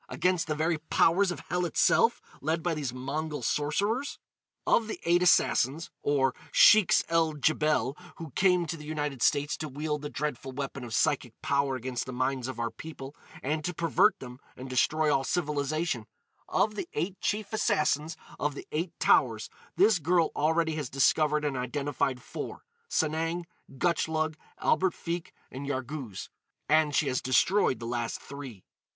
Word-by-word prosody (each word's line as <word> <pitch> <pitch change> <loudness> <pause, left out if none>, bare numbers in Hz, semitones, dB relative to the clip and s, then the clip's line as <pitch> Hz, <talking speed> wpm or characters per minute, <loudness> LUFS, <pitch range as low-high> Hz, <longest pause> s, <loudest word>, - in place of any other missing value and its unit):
—against 180 -3 0
the 155 - -1
very 160 +1 0
powers 170 +4 +3
of 175 - -4
hell 180 0 +1
itself, 230 +6 +3 0.2
led 160 +3 -1
by 175 - 0
these 145 -5 -3
Mongol 145 +3 -4
sorcerers? 200 - 0 0.5
"Of 225 - +3
the 220 - -5
Eight 175 +1 +3
Assassins—or 145 -4 +2 0.2
Sheiks 215 -5 +6
el 165 -1 +2
Djebel—who 155 +2 -1
came 180 +2 +3
to 165 - -4
the 150 - -10
United 150 -4 -3
States 145 +2 +2
to 155 - -5
wield 150 +2 -3
the 145 - -5
dreadful 135 -2 -4
weapon 135 -1 -5
of 115 -2 -4
psychic 125 -5 0
power 140 -1 +1
against 130 0 -4
the 130 - -5
minds 130 0 -1
of 130 -3 -6
our 115 -1 -1
people, 145 -3 -9 0.3
and 155 +3 -1
to 180 +1 -3
pervert 165 -2 +3
them 125 -1 -10 0.2
and 130 - -7
destroy 150 +4 +2
all 135 - +1
civilisation,—of 150 - -2
the 195 -4 -5
Eight 180 +5 -3
Chief 210 0 -2
Assassins 155 -6 +1 0.2
of 150 -1 -1
the - - -8
Eight 165 +3 -3
Towers, 115 -4 +3 0.2
this 195 +2 +4
girl 170 +2 +2
already 160 +2 +1
has 145 -5 -3
discovered 150 +2 +2
and 145 -2 -1
identified 130 0 -2
four,—Sanang, 170 - -3 0.3
Gutchlug, 160 0 0 0.2
Albert 185 -2 +2
Feke, 170 0 -4 0.2
and 135 +2 -6
Yarghouz; 130 - -5 0.4
and 155 0 +3
she 150 - +2
has 130 -1 0
destroyed 130 - +3
the 115 - -7
last 120 -1 -2
three." 135 -8 -9
150 Hz, 155 wpm, -29 LUFS, 135-170 Hz, 0.5 s, Sheiks